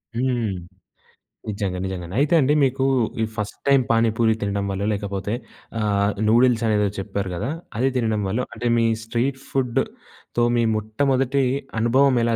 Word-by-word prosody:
హ్మ్. 120 -2 0 1.0
నిజంగా. 100 -3 -2
నిజంగండి. 90 -1 -5
అయితే 145 +3 +2
అండి, 145 0 +3
మీకూ 135 0 +1 0.4
ఈ - - +3
ఫస్ట్ 105 -2 -4
టైమ్ 140 -2 +5
పానీపూరి 115 0 +3
తినడం 100 0 -1
వల్లో, 95 +1 -2
లేకపోతే 100 0 -3 0.5
ఆహ్, 100 -1 +1 0.2
నూడిల్సనేదో 115 -3 +3
చెప్పారు 100 -1 -3
గదా! 105 +9 -3 0.3
అది 130 +3 +2
తినడం 110 -3 0
వల్లో 110 +6 -1
అంటే, 120 - -3
మీ 115 - +3 0.2
స్ట్రీట్ 120 +4 -1
ఫుడ్‌తో 120 -2 -2
మీ 120 - +3
మొట్టమొదటి 135 +5 +1 0.4
అనుభవం 130 +3 +4
ఎలా 115 0 +2
115 Hz, 135 wpm, -23 LUFS, 105-125 Hz, 1.0 s, టైమ్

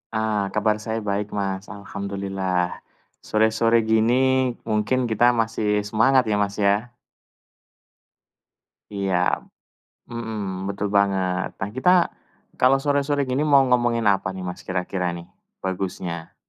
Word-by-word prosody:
Ah, 110 -2 0
kabar 105 0 +1
saya 110 +1 -3
baik, 100 0 -1
Mas. 95 0 -3
Alhamdulillah. 95 -3 -3 0.5
Sore-sore 115 +1 +3
gini 110 +2 +3 0.5
mungkin 110 +4 +1
kita 115 0 +2
masih 110 -2 0
semangat 130 +4 +4
ya, 105 - +2
Mas, 100 0 -1
ya. 105 +4 0 2.0
Iya. 100 -2 -1 1.0
Mhm, 105 -5 -4
betul 100 +1 -2
banget. 95 -2 +1
Nah, 95 - -3
kita 130 +7 +2 0.7
kalau 130 +2 +5
sore-sore 145 0 +1
gini 130 +3 0
mau 140 -2 +6
ngomongin 120 -2 +2
apa 95 -1 -1
nih, 95 - -6
Mas, 90 - -6
kira-kira 90 0 -2
nih 85 0 -9 0.4
bagusnya? 90 -3 -4
105 Hz, 115 wpm, -23 LUFS, 95-115 Hz, 2.0 s, mau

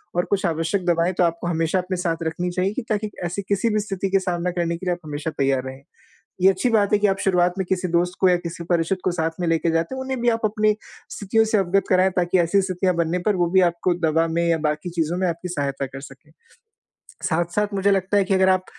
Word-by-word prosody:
और 175 - +1
कुछ 200 -1 -1
आवश्यक 165 +3 -1
दवाएँ 170 +1 +2
तो 180 - +1
आपको 170 +1 -1
हमेशा 165 +2 0
अपने 180 0 -3
साथ 170 -2 -1
रखनी 170 +2 -2
चाहिए 185 +3 -1
कि 265 - -3
ताकि 215 -1 -1 0.2
ऐसी 175 +3 -3
किसी 200 +3 0
भी 215 - +2
स्थिति 195 -2 -3
का 195 - +4
सामना 180 -1 -2
करने 170 -1 -1
के 185 - -9
लिए 180 - +1
आप 175 - -7
हमेशा 150 +1 -4
तैयार 135 -1 +1
रहें। 130 +1 -8 0.6
ये 190 - +7
अच्छी 195 +6 +1
बात 210 -2 +2
है 210 - +5
कि 210 - +3
आप 195 0 +1
शुरुआत 180 -2 +2
में 190 - -1
किसी 185 -1 0
दोस्त 175 +1 +1
को 185 - +5
या 180 - +4
किसी 170 0 -7
परिचित 170 +2 0
को 185 - +1
साथ 165 -2 -1
में 175 - -1
लेके 165 0 +1
जाते 165 +10 -1
हैं 265 - -5
उन्हें 260 -1 -3
भी 240 - +3
आप 230 0 0
अपनी 215 0 +2 0.4
स्थितियों 220 +2 +1
से 220 -1 +1
अवगत 195 +1 +1
कराएँ 185 0 +4
ताकि 175 +1 +2
ऐसी 175 +4 +3
स्थितियाँ 185 -1 0
बनने 170 +1 0
पर 210 - +3
वो 175 -1 +1
भी 190 0 +5
आपको 170 +1 -1
दवा 165 +1 +2
में 170 +1 0
या 165 -1 +2
बाकी 150 +4 -2
चीज़ों 170 0 -1
में 185 - 0
आपकी 170 +1 -3
सहायता 140 -4 -2
कर 135 +1 -9
सकें। 140 +2 -14 0.9
साथ-साथ 175 +5 0
मुझे 200 +1 +2
लगता 195 +1 +1
है 200 - +4
कि 195 +1 -1
अगर 190 0 +4
आप 185 0 +2
180 Hz, 250 wpm, -22 LUFS, 165-195 Hz, 0.9 s, ये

